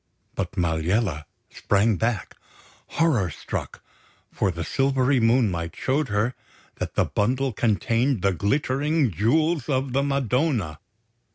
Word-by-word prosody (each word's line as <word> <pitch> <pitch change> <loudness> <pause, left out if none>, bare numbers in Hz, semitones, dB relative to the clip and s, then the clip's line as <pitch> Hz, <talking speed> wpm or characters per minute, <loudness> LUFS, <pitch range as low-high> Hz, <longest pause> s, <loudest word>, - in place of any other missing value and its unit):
But - - -3
Maliella 85 0 0 0.3
sprang 105 +2 +1
back, 115 -3 -2 0.5
horror 135 - +1
struck; - - -6 0.5
for - - 0
the 85 -2 -4
silvery 135 +3 +1
moonlight 110 -8 +1
showed 140 +3 0
her 105 +4 0 0.4
that - - -4
the - - +3
bundle 130 +4 0
contained 115 +2 +1
the 100 -1 +3
glittering 140 - +1
Jewels 155 - +1
of 130 -1 0
the 135 - +2
Madonna! 130 - 0
120 Hz, 115 wpm, -24 LUFS, 100-135 Hz, 0.5 s, the